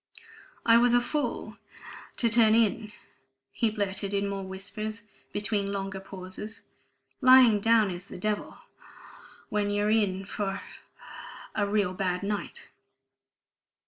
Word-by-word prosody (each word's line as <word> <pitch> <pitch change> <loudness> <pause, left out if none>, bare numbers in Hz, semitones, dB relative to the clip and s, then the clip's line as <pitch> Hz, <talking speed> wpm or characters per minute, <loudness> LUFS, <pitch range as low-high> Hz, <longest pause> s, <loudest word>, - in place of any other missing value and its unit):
"I 230 0 +7
was 240 0 +4
a - - +6
fool... 290 +4 -3 0.6
to 235 - +3
turn 225 -1 +5
in," 220 -1 +1 0.6
he 230 - +1
blurted 200 -1 -2
in 200 0 0
more 200 0 -3
whispers 210 +3 -5 0.3
between 205 -1 0
longer 195 -1 -4
pauses. 190 +3 -8 0.6
"Lying 255 -5 +7
down 220 -2 +3
is 180 +2 -7
the - - -9
devil... 210 +3 -3 0.9
when 210 -1 0
you're 205 +1 +1
in 195 -3 +1
for 195 -1 -3 0.9
a 205 -1 0
real 200 -3 +1
bad 185 0 -2
night. 205 0 -4
205 Hz, 120 wpm, -28 LUFS, 195-220 Hz, 0.9 s, I